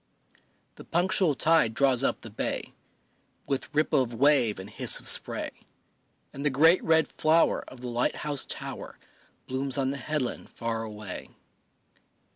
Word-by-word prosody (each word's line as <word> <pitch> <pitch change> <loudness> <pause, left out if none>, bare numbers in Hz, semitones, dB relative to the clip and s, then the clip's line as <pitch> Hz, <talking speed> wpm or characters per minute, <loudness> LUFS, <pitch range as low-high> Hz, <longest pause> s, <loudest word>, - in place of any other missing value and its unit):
The - - -10
punctual 175 -2 +1
tide 155 -7 +3
draws 135 -2 +3
up - - 0
the - - -10
bay, - - -3 0.7
With 135 -1 -3
ripple 150 -2 +2
of 120 -2 -3
wave 135 -4 +3
and 95 - -8
hiss 105 - +3
of - - -7
spray, - - 0 0.8
And 140 - -6
the 150 - +3
great 160 +6 +4
red 160 -1 +3
flower 160 +2 +2
of 130 - -12
the 125 - -5
light 120 0 0
house 145 -2 0
tower - - -5 0.5
Blooms 130 +1 -2
on 135 -1 0
the 140 - -4
headland 140 -1 -3
far 115 -1 -3
away. 105 -3 -7
135 Hz, 150 wpm, -27 LUFS, 120-155 Hz, 0.8 s, great